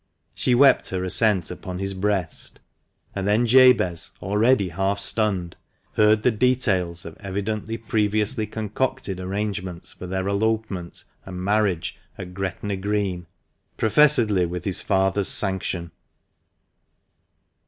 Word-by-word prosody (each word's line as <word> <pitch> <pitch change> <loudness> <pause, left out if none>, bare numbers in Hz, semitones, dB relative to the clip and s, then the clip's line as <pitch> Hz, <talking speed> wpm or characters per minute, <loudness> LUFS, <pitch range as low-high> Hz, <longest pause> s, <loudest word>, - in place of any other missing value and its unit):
She 125 - +1
wept 135 +2 +4
her 95 -1 -3
assent 95 -1 +2
upon 90 0 -7
his 95 +1 -2
breast, 95 -3 -3 0.5
and 95 0 -3
then 110 +4 +2
Jabez, 125 -8 +4
already 105 +1 +2
half 95 +4 -1
stunned, 100 -4 0 0.4
heard 105 0 +3
the 125 - +4
details 105 -8 0
of 80 - -9
evidently 105 +3 -4
previously 110 0 -1
concocted 110 -2 -3
arrangements 95 -2 -4
for 90 - -9
their 95 +1 -3
elopement 100 -3 -2 0.2
and 90 -1 -8
marriage 100 -4 0 0.2
at 90 -1 -8
Gretna 95 +1 -4
Green, 95 -3 -2 0.5
professedly 110 -6 +3
with 90 +1 -6
his 95 -3 +3
father's 95 +1 +1
sanction. 95 -4 +1
100 Hz, 115 wpm, -23 LUFS, 95-110 Hz, 0.5 s, wept